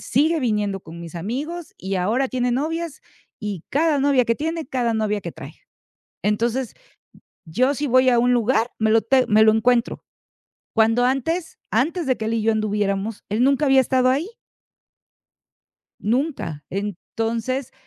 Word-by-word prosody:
sigue 310 +5 +1
viniendo 210 -5 -1
con 165 0 -11
mis 170 0 -9
amigos 285 - -5
y 190 +1 -4
ahora 220 +9 +1
tiene 250 -1 -1
novias 315 +4 -2 0.4
y 205 -6 -5
cada 300 0 +2
novia 275 -3 +3
que 230 - +1
tiene, 320 +2 -3
cada 245 -3 -1
novia 210 -1 0
que - - -6
trae. - - -10 0.7
Entonces 235 +4 0 0.7
yo 245 - +1
si 290 +2 -2
voy 255 0 +4
a 240 -1 +4
un 245 +1 +3
lugar, 240 0 +1
me 220 0 +2
lo 225 - +5
te 260 +1 +2
me 215 +1 +5
lo 220 - +6
encuentro. 235 +2 +1 0.7
Cuando 225 +2 +3
antes, 320 +6 -1
antes 305 - 0
de 260 - +1
que 220 - -4
él 225 - -1
y 225 - 0
yo 225 +1 +2
anduviéramos, 210 -1 -1
él 220 +4 +1
nunca 280 +2 +3
había 270 -1 +5
estado 255 0 +3
ahí. 290 +8 0 1.7
Nunca. 225 - -2
Entonces, 225 +6 -3
240 Hz, 160 wpm, -22 LUFS, 215-270 Hz, 1.7 s, lo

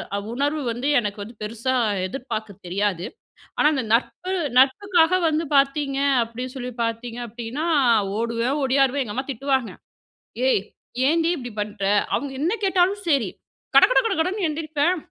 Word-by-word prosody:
அ - - 0 0.2
உணர்வு 290 +4 0
வந்து 245 +4 -3
எனக்கு 205 -2 -4
வந்து, 225 +4 -11
பெருசா 230 +4 -2 0.3
எதிர்பாக்கத் 220 -4 -6
தெரியாது. 185 0 -1 0.5
ஆனா, - - +4
அந்த 265 -3 -1
நட்பு 360 +10 0 0.3
நட்புக்காக 345 +5 +4
வந்து 315 +1 0
பாத்தீங்க 275 0 +2 0.2
அப்டின்னு 250 +3 -7
சொல்லி 250 -1 -5
பார்த்தீங்க 230 +1 -4
அப்டின்னா, 235 +7 -5 0.5
ஓடுவேன் 235 +4 -1
ஓடியாருவேன். 270 +1 +2
எங்க 210 - -6
அம்மா 265 - -3
திட்டுவாங்க 265 -1 -1 0.8
''ஏய் 205 - +3 0.5
ஏன்டி 330 +2 +2
இப்படி 245 -5 -7
பண்ணுற?'' 205 -1 -1 0.2
அவுங்க 280 -1 -3
என்ன 340 +6 +1
கேட்டாலும் 385 +2 +2
செரி. 270 - +2 0.5
கட - - +9
கட - - +5
கட 430 -4 +1
கடன்னு 370 +3 -1
எந்திரிப்பேன். 310 +2 0
265 Hz, 145 wpm, -23 LUFS, 230-310 Hz, 0.8 s, கட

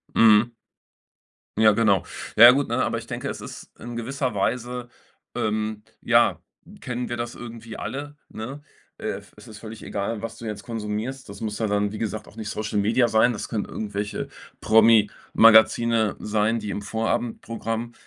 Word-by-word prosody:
Mhm. 110 +1 +6 1.1
Ja, 110 0 +6
genau. 105 -3 +3 0.3
Ja 120 +2 +11
gut, 140 +2 0
ne, - - +1
aber - - -1
ich - - -12
denke, - - -4
es - - -6
ist - - -10
in 120 0 -7
gewisser 125 +2 -2
Weise, 120 +4 -2 0.5
ähm, 110 0 -2 0.2
ja - - +3 0.4
kennen 125 0 -4
wir 120 - -3
das 120 0 -4
irgendwie 115 -1 -9
alle, 145 +2 -6
ne? 130 +7 -7 0.4
Äh, - - -4
v - - -21
es - - -14
ist 110 - -11
völlig 110 0 -9
egal, 105 +2 -3
was 115 0 -6
du 115 - -9
jetzt 105 -2 -5
konsumierst. 115 +3 -4
Das 100 0 -10
muss 105 -2 -3
ja 110 - -1
dann, 105 0 0
wie 110 - -6
gesagt, 110 -1 -4
auch - - -16
nicht 110 -2 -6
Social 105 0 -3
Media 115 +4 +3
sein. 110 +2 +4
Das 105 - -5
können 105 -3 -1
irgendwelche 105 -1 -4 0.3
Promi-Magazine 110 0 +5
sein, 110 +2 0
die 105 -1 -6
im 100 - -3
Vorabendprogramm, 115 +1 -3
110 Hz, 170 wpm, -24 LUFS, 105-120 Hz, 1.1 s, Ja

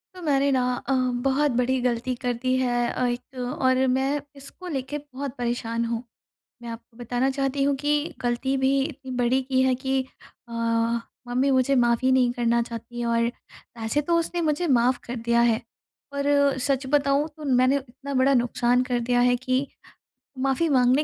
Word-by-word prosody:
तो 365 - -10
मैंने 280 -3 +2
ना 260 - +2 0.3
अ, 270 - +2 0.3
बहुत 275 +2 +2
बड़ी 255 +1 +1
गलती 245 +1 0
कर 245 -2 0
दी 255 0 +1
है 240 -2 +1
अ, 250 - -1
1 245 +2 -5
और 260 +1 +1
मैं 270 +3 +1
इसको 280 +6 -11
लेके 285 -2 -3
बहुत 280 -2 -7
परेशान 235 -1 -2
हूँ। 230 0 -3 0.6
मैं 235 - -6
आपको 230 0 -10
बताना 245 +2 0
चाहती 275 0 -1
हूँ 280 0 +2
कि 295 +2 -1
गलती 245 +2 0
भी 265 0 +2
इतनी 270 -3 -7
बड़ी 250 +2 +2
कि 260 0 +1
है 260 -1 +3
कि 265 +1 0 0.5
अ, 235 - -8 0.7
मम्मी 255 +3 +1
मुझे 260 +1 +3
माफ़ 240 -2 +3
ही 260 - +4
नहीं 255 -2 +4
करना 235 -1 +1
चाहती 235 +1 -7
है। 240 - -1
और 230 0 +2 0.5
वैसे 225 +6 0
तो 335 +3 +1
उसने 340 +1 -2
मुझे 320 +2 0
माफ़ 250 -2 +3
कर 240 - -5
दिया 235 0 +1
है 220 - 0 0.5
पर 280 -1 +2
सच 270 +1 0
बताऊँ 285 +1 +2
तो 305 - -9
मैंने 255 0 +3
इतना 275 +1 -8
बड़ा 265 +1 +3
नुक़सान 245 0 +2
कर 250 -1 -1
दिया 245 +1 +1
है 245 0 +4
कि 255 +2 -1 0.7
माफ़ी 270 +5 +1
माँगने 260 +1 +4
260 Hz, 185 wpm, -25 LUFS, 245-275 Hz, 0.7 s, ही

